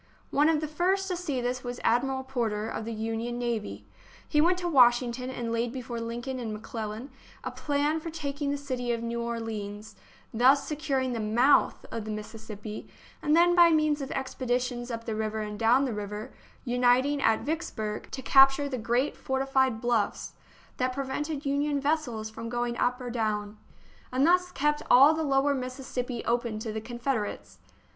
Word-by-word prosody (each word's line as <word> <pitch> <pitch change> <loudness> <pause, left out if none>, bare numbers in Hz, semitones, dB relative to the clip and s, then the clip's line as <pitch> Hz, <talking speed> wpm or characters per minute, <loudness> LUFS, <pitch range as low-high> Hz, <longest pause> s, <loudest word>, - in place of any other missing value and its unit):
One 295 +3 +4
of 315 -2 +2
the 310 - -2
first 370 +5 0
to 365 - 0
see 300 -8 -2
this 250 +1 -2
was 245 0 -5
Admiral 265 +3 +1
Porter, 230 -5 -2
of 220 - -4
the 230 - -4
Union 225 +2 -3
navy. 235 -3 -3 0.4
He 300 - +3
went 355 +3 +3
to 360 -1 -3
Washington 250 -3 +4
and 240 -3 -4
laid 230 +1 0
before 240 -2 -5
Lincoln 240 +3 -4
and 230 -3 -4
McClellan 215 +3 -6 0.3
a - - -4
plan 295 +2 0
for 330 - -6
tak 295 -3 -5
ing 285 - 0
the 285 - 0
city 255 -4 -3
of 230 0 -3
New 235 0 -2
Orleans, 220 -2 -5 0.4
thus 260 +5 +5
securing 275 -4 -1
the 230 - -2
mouth 235 +6 +3
of 225 -2 -4
the - - -6
Mississippi, 215 0 -7 0.3
and 300 +1 +3
then 350 +1 +5
by 345 -1 +8
means 305 -2 +2
of 270 - -4
expeditions 250 -2 -2
up 230 -1 -5
the 225 - -2
river 215 0 -2
and 210 -1 -5
down 245 +5 +4
the 250 - -2
river, 210 +3 -6 0.3
unit 245 +1 +3
ing 285 0 -1
at 225 -3 +3
Vicksburg, 220 -9 -4
to 265 - -6
capture 270 +2 +6
the 260 -3 -3
great 240 +5 0
fortified 265 -3 0
THE - - -6
BOOK - - +2
OF 235 - +5
FAMOUS 205 - -2
SIEGES - - -7
bluffs - - -29
that 255 0 0
prevented 275 +3 -3
Union 285 +1 +1
vessels 270 -7 -1
from 225 +1 -6
going 240 0 -1
up 250 +1 +1
or 245 -1 -5
down, 215 -2 -2 0.5
and 260 +2 +2
thus 360 +1 +4
kept 295 +1 0
all 275 +5 +8
the 320 - -2
lower 280 -1 +2
Mississippi 255 -2 -4
open 235 -2 0
to 220 0 -4
the 220 - -3
Confederates. 240 -2 -3
250 Hz, 190 wpm, -28 LUFS, 230-280 Hz, 0.5 s, by